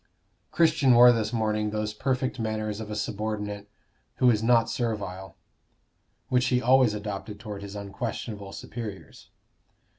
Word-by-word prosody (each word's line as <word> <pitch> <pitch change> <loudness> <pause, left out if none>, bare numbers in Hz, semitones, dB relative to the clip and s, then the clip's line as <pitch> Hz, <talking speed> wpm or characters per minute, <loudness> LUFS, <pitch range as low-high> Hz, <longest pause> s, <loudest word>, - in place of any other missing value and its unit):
Christian 155 -6 +4
wore 120 +1 +9
this 110 -2 0
morning 110 -2 0
those 105 0 -2
perfect 130 +2 -1
manners 110 -1 -2
of 110 -1 -6
a 105 - -4
subordinate 105 -1 -4 0.5
who 125 -1 +4
is 110 -2 +1
not 115 0 +4
servile, 105 -5 -4 0.9
which 125 0 +2
he 125 -1 +2
always 125 -2 +4
adopted 105 0 -6
toward 105 -2 -7
his 100 0 -8
unquestionable 100 0 -5
superiors. 105 -2 -8
110 Hz, 130 wpm, -27 LUFS, 105-120 Hz, 0.9 s, wore